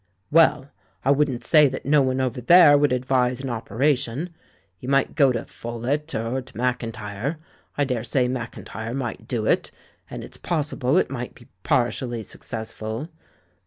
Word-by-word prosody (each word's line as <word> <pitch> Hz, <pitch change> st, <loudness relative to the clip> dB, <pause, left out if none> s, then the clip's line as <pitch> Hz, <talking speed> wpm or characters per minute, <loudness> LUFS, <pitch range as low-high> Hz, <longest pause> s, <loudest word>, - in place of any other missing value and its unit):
"Well, 150 Hz, -3 st, +4 dB, 0.3 s
I 135 Hz, -, +5 dB
wouldn't 140 Hz, -4 st, +1 dB
say 150 Hz, -3 st, +6 dB
that 130 Hz, 0 st, -5 dB
no 145 Hz, +1 st, +4 dB
one 130 Hz, 0 st, 0 dB
over 130 Hz, -1 st, -1 dB
there 165 Hz, +2 st, +8 dB
would 145 Hz, -1 st, +3 dB
advise 125 Hz, 0 st, +1 dB
an 135 Hz, -2 st, -3 dB
operation. 125 Hz, -, -1 dB, 0.5 s
You 125 Hz, -, -6 dB
might 135 Hz, 0 st, +2 dB
go 140 Hz, -4 st, +4 dB
to 115 Hz, -2 st, -3 dB
Pholett, 130 Hz, +7 st, -4 dB
or 115 Hz, +4 st, -2 dB
to 130 Hz, -, -14 dB
Maclntyre 115 Hz, +1 st, -2 dB, 0.2 s
— -, -, -36 dB
I 145 Hz, -, +3 dB
daresay 125 Hz, 0 st, 0 dB
JNIacIntjTe 115 Hz, -2 st, -5 dB
might 125 Hz, -4 st, -4 dB
do 115 Hz, -4 st, -2 dB
it -, -, +1 dB, 0.2 s
— -, -, -37 dB
and -, -, -7 dB
it's -, -, -10 dB
possible 150 Hz, -3 st, 0 dB
it -, -, +2 dB
might 125 Hz, -2 st, -5 dB
be 120 Hz, -, -18 dB
partially 120 Hz, 0 st, 0 dB
successful. 110 Hz, +6 st, -6 dB
130 Hz, 165 wpm, -24 LUFS, 120-140 Hz, 0.5 s, there